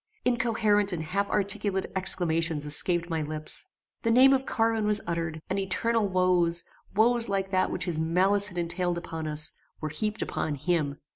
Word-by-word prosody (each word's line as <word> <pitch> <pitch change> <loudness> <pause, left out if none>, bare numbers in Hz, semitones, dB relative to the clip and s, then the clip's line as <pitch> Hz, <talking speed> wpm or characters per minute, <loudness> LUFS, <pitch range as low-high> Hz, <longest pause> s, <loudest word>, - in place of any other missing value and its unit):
Incoherent 220 -5 +2
and 160 -2 -3
half 200 +5 -2
articulate 200 -1 -1
exclamations 165 -4 +2
escaped 170 +3 +1
my 165 -2 -2
lips. 155 0 0 0.3
The 230 - 0
name 260 +4 +6
of 270 0 0
Carwin 225 -2 0
was 210 0 +3
uttered, 165 -2 -3
and 190 +1 -2
eternal 210 +3 0
woes, 180 -2 +1 0.3
woes 230 +2 +3
like 195 -1 -2
that 185 -1 +1
which - - -1
his 165 -3 -1
malice 190 +5 +2
had 180 -3 -8
entailed 175 +1 -1
upon 160 -2 -6
us, 150 0 0 0.3
were 155 - -4
heaped 210 +8 -3
upon 155 -2 -3
him. 145 -2 -1
185 Hz, 165 wpm, -27 LUFS, 165-210 Hz, 0.3 s, name